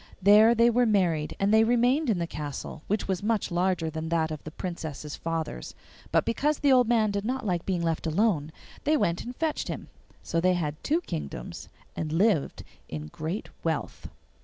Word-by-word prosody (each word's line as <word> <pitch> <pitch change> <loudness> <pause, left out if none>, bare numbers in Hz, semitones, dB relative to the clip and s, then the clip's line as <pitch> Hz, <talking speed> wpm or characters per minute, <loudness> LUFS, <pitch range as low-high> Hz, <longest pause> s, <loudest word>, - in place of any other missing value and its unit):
There 210 +4 +7
they 235 +1 +5
were 245 +1 +3
married, 175 -8 +1
and 200 +2 +2
they 220 0 +6
remained 245 +5 +2
in 210 - +2
the 170 - -1
castle, 150 -2 -6
which 210 +1 -1
was 190 -2 -1
much 210 -2 0
larger 175 -1 +1
than 160 +1 -4
that 160 -1 +1
of 155 - -6
the - - -6
Princess's 155 -4 -6
father's. 165 - -4 0.4
But - - +3
because 290 +6 +1
the 285 - +3
old 250 -3 +5
man 220 -3 +3
did 200 0 -2
not 255 +2 -2
like 175 -4 -1
being 180 -3 0
left 165 0 -1
alone, 160 -3 +1 0.3
they 305 +1 +3
went 170 -9 0
and 245 +1 -7
fetched 315 +1 -1
him. - - -6 0.3
So 165 - -1
they 185 +1 +3
had 150 -3 -3
two 320 +4 +1
kingdoms 70 - -6 0.3
and 155 -1 -3
lived 175 -2 +1 0.3
in 75 -1 -6
great 160 - -4
wealth. 160 -2 -3
185 Hz, 190 wpm, -27 LUFS, 160-230 Hz, 0.4 s, There